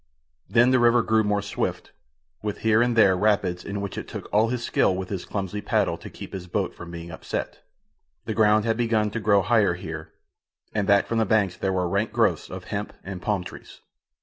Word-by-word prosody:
Then 120 Hz, +5 st, +5 dB
the 130 Hz, -, +4 dB
river 120 Hz, 0 st, +4 dB
grew 110 Hz, 0 st, +2 dB
more 105 Hz, -1 st, 0 dB
swift, 105 Hz, -, -3 dB, 0.5 s
with 105 Hz, -1 st, -4 dB
here 110 Hz, 0 st, +4 dB
and 120 Hz, 0 st, +2 dB
there 100 Hz, -5 st, +5 dB
rapids 95 Hz, -3 st, +1 dB
in 100 Hz, 0 st, -4 dB
which 100 Hz, -, -4 dB
it -, -, -8 dB
took -, -, -7 dB
all 110 Hz, +2 st, +4 dB
his 120 Hz, 0 st, -2 dB
skill 95 Hz, -, +2 dB
with 95 Hz, 0 st, -5 dB
his 95 Hz, -3 st, -4 dB
clumsy 100 Hz, 0 st, -4 dB
paddle -, -, +1 dB
to -, -, -9 dB
keep -, -, -10 dB
his 90 Hz, -2 st, -6 dB
boat 95 Hz, +1 st, -1 dB
from 85 Hz, -, -10 dB
being 85 Hz, 0 st, -8 dB
upset. 80 Hz, -, -5 dB, 0.7 s
The -, -, -2 dB
ground 105 Hz, -1 st, +4 dB
had 115 Hz, -1 st, +1 dB
begun 110 Hz, -3 st, +1 dB
to 115 Hz, -, -3 dB
grow 100 Hz, -2 st, +3 dB
higher 105 Hz, -4 st, +3 dB
here, 90 Hz, -, -7 dB, 0.6 s
and 105 Hz, -2 st, 0 dB
back 100 Hz, -1 st, +4 dB
from 115 Hz, -, -1 dB
the 110 Hz, -, +3 dB
banks 100 Hz, -3 st, +2 dB
there 95 Hz, -, -1 dB
were 90 Hz, -1 st, 0 dB
rank 100 Hz, +5 st, 0 dB
growths -, -, +1 dB
of -, -, -7 dB
hemp -, -, -4 dB
and 95 Hz, -2 st, -7 dB
palm 100 Hz, -3 st, -1 dB
trees. -, -, -11 dB
105 Hz, 215 wpm, -25 LUFS, 95-110 Hz, 0.7 s, Then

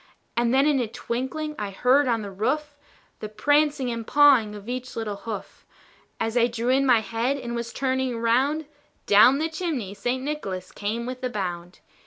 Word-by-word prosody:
And 235 Hz, 0 st, +2 dB
then 270 Hz, +2 st, +4 dB
in 295 Hz, -2 st, +3 dB
a 240 Hz, -, -1 dB
twinkling 260 Hz, +7 st, -4 dB
I 205 Hz, -1 st, -3 dB
heard 255 Hz, +8 st, +3 dB
on 230 Hz, -3 st, 0 dB
the 200 Hz, -, -6 dB
roof, 290 Hz, +9 st, -2 dB, 0.4 s
The 215 Hz, -, -6 dB
prancing 290 Hz, +3 st, +1 dB
and 230 Hz, -1 st, -5 dB
pawing 270 Hz, -8 st, +5 dB
of 205 Hz, 0 st, -11 dB
each 255 Hz, +1 st, -5 dB
little 220 Hz, -3 st, -3 dB
hoof. 210 Hz, -2 st, -7 dB, 0.6 s
As 225 Hz, +1 st, -2 dB
I 240 Hz, -1 st, +4 dB
drew 235 Hz, 0 st, -3 dB
in 270 Hz, +1 st, +3 dB
my 240 Hz, -3 st, +5 dB
head, 230 Hz, +6 st, -1 dB
and 240 Hz, -3 st, -5 dB
was 235 Hz, 0 st, -4 dB
turning 260 Hz, -1 st, -1 dB
around, 260 Hz, +7 st, +1 dB, 0.4 s
Down 215 Hz, +6 st, +6 dB
the 315 Hz, +2 st, 0 dB
chimney 310 Hz, -, -3 dB
St. 245 Hz, +6 st, -2 dB
Nicholas 195 Hz, -11 st, -4 dB
came 220 Hz, +3 st, -3 dB
with 255 Hz, +1 st, -6 dB
a 255 Hz, -, 0 dB
bound. 180 Hz, -5 st, -5 dB
245 Hz, 185 wpm, -25 LUFS, 220-275 Hz, 0.6 s, Down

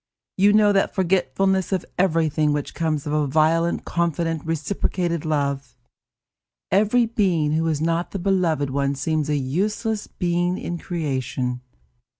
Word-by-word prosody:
You 200 Hz, +2 st, +4 dB
know 210 Hz, -1 st, +5 dB
that 195 Hz, -, +1 dB
forgetfulness 190 Hz, +1 st, +1 dB
of 185 Hz, -3 st, -1 dB
everything 160 Hz, -4 st, +2 dB
which 145 Hz, -1 st, -3 dB
comes 155 Hz, -3 st, -1 dB
of 150 Hz, -, -2 dB
a 150 Hz, -1 st, +1 dB
violent 160 Hz, +4 st, +2 dB
confident, 165 Hz, -2 st, -1 dB
reciprocated 165 Hz, +1 st, -2 dB
love. 140 Hz, -4 st, -2 dB, 0.9 s
Every 215 Hz, +5 st, +3 dB
being 185 Hz, -9 st, +1 dB
who 160 Hz, +1 st, +1 dB
is 155 Hz, -2 st, -1 dB
not 165 Hz, +2 st, 0 dB
the -, -, -5 dB
beloved 175 Hz, -7 st, 0 dB
one 140 Hz, 0 st, 0 dB
seems 150 Hz, +2 st, -1 dB
a 150 Hz, -, +1 dB
useless 205 Hz, -, -2 dB
being 175 Hz, 0 st, -1 dB
in 170 Hz, 0 st, -4 dB
creation. 130 Hz, -7 st, -3 dB
165 Hz, 140 wpm, -23 LUFS, 150-185 Hz, 0.9 s, know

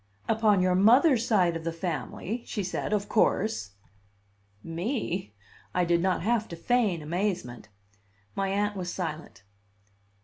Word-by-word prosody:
"Upon 215 Hz, -3 st, +3 dB
your 185 Hz, 0 st, +3 dB
mother's 235 Hz, -, +5 dB
side 180 Hz, -6 st, +3 dB
of 165 Hz, -, -5 dB
the 165 Hz, -, -2 dB
family," 170 Hz, -, -4 dB
she 205 Hz, -, -3 dB
said, 180 Hz, +2 st, -3 dB
"of 205 Hz, -1 st, 0 dB
course." 200 Hz, -, +1 dB, 0.9 s
"Me!" 180 Hz, -, -3 dB, 0.4 s
I 180 Hz, -1 st, +3 dB
did 170 Hz, 0 st, +2 dB
not 185 Hz, -1 st, 0 dB
have 225 Hz, +1 st, +1 dB
to 170 Hz, -, -7 dB
feign 205 Hz, -4 st, +1 dB
amazement. 165 Hz, -, -3 dB, 0.6 s
My 195 Hz, 0 st, -1 dB
Aunt 205 Hz, +1 st, 0 dB
was 180 Hz, -2 st, -4 dB
silent. 160 Hz, -, -5 dB
185 Hz, 135 wpm, -28 LUFS, 170-215 Hz, 0.9 s, mother's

